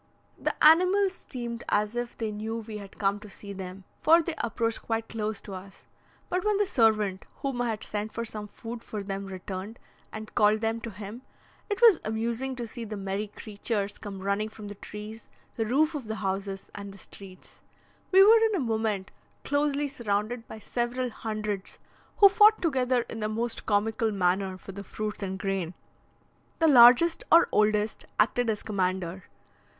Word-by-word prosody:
The - - -1
animals 365 +5 +6 0.2
seemed 235 -2 -5
as 210 +2 +1
if 240 0 -4
they 220 -2 -2
knew 215 +2 -4
we 220 -2 -6
had 200 -1 -12
come 200 0 +1
to 210 0 -12
see 200 0 -9
them, 190 0 -8 0.2
for 330 +2 +7
they 335 - -3
approached 230 0 -1
quite 225 0 -2
close 215 -2 -3
to 200 - -9
us; 190 +1 -10 0.4
but 360 0 -1
when 425 -1 +2
the 415 - +3
servant, 215 - +2 0.2
whom 270 -3 -1
I 240 - 0
had 220 -1 -3
sent 210 +1 -3
for 230 - -4
some 210 -1 -6
food 230 +2 -8
for 210 -2 -5
them, 195 0 -4
returned, 190 +3 -6 0.3
and 215 0 -8
called 210 +1 +4
them 225 0 -1
to 230 - -5
him, 210 +3 -8 0.5
it 410 +2 -2
was 440 -8 +8
amusing 230 +4 -2
to 240 -1 -4
see 230 +1 -7
the 215 -1 -6
merry 195 +2 -3
creatures 205 0 -4
come 200 -3 -7
running 200 +2 0
from 215 -1 -9
the - - -6
trees, 210 +2 -9 0.3
the 225 -2 -1
roofs 305 +7 +3
of 285 -5 -5
the 220 0 -4
houses, 195 -1 -3
and 200 -1 -7
the 195 - -13
streets. 190 -1 -13 0.5
We 385 +1 +8
were 445 +3 +8
in 435 - -1
a - - 0
moment 220 -6 -1 0.3
closely 290 0 +1
surrounded 230 -2 -2
by - - -8
several 240 +3 -2
hundreds, 215 -3 -4 0.4
who 405 - +10
fought 420 +2 +6
together 255 -6 +1
in 225 - -6
the 215 0 -1
most 230 +2 -3
comical 220 +2 +1
manner 190 0 0
for 195 - -10
the 200 +1 -8
fruits 210 +2 -5
and 190 -1 -3
grain. 190 -3 -2 0.8
The 325 - +3
largest 260 +5 +7
or 335 +1 +7
oldest 210 0 +1
acted 230 +2 +3
as 215 -2 -2
commander. 185 -2 -2
220 Hz, 180 wpm, -28 LUFS, 200-245 Hz, 0.8 s, who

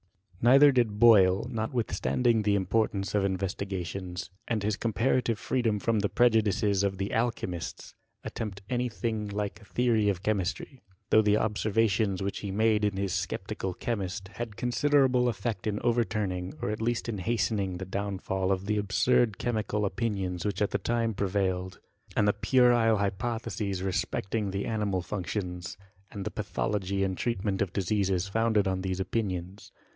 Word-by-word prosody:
Neither 135 +4 +7
did 120 -5 +1
Boyle, 100 -4 +6
notwithstanding 115 0 0
the 105 -1 +2
importance 100 0 0
of 105 - +2
his 100 - +1
investigations, 95 -1 -4 0.2
and 110 -3 -1
his 105 0 +1
compa* 115 +4 +1
rative 115 -3 -1
freedom 115 -2 0
from 110 +2 +1
the 100 0 0
prejudices 105 -4 +3
of 100 -1 0
the 100 +1 -3
alchymists, 110 -7 -3 0.3
attempt 100 -3 -5
any 125 0 -1
thing 110 -2 -3
like 105 +1 -4
a - - -15
theory 115 -3 +2
of 95 -1 -2
chemistry; 110 +6 -2 0.3
though 110 - +7
the 105 0 +3
observations 105 -2 +1
which 100 - -3
he 100 - -5
made 105 +2 +2
in 105 -2 +1
his 100 -2 -1
Sceptical 95 0 -3
Che 120 - -2
mist, 95 -2 -4
had 115 0 -6
considerable 125 0 +3
effect 105 -2 -3
in 105 -1 -1
overturning, 105 -6 -1
or - - -2
at 110 - -4
least 120 +1 -1
in 110 -4 -3
hastening 100 -2 0
the 95 - -5
downfal 95 0 -2
of 95 0 -1
the 105 +1 0
absurd 105 +2 +2
chemical 110 -3 -1
opi. 115 +4 -1
nions 90 -3 -3
which 100 0 0
at 105 - -1
that - - -2
time 115 -1 0
prevailed, 95 -2 -1 0.4
and 105 - +3
the 105 - +4
puerile 120 0 +4
hypotheses 100 -1 -2
respecting 95 +2 -1
the 100 +1 -3
animal 105 -5 -1
functions, 90 -1 -4 0.3
and 100 -2 -6
the - - -3
pathology 100 -1 -2
and 95 -1 -2
treatment 100 -4 -1
of 100 -3 0
diseases 95 -1 0
founded 110 0 +2
on 95 -1 -1
these 95 0 -2
opinions. 95 -1 -3
105 Hz, 160 wpm, -28 LUFS, 95-115 Hz, 0.4 s, Neither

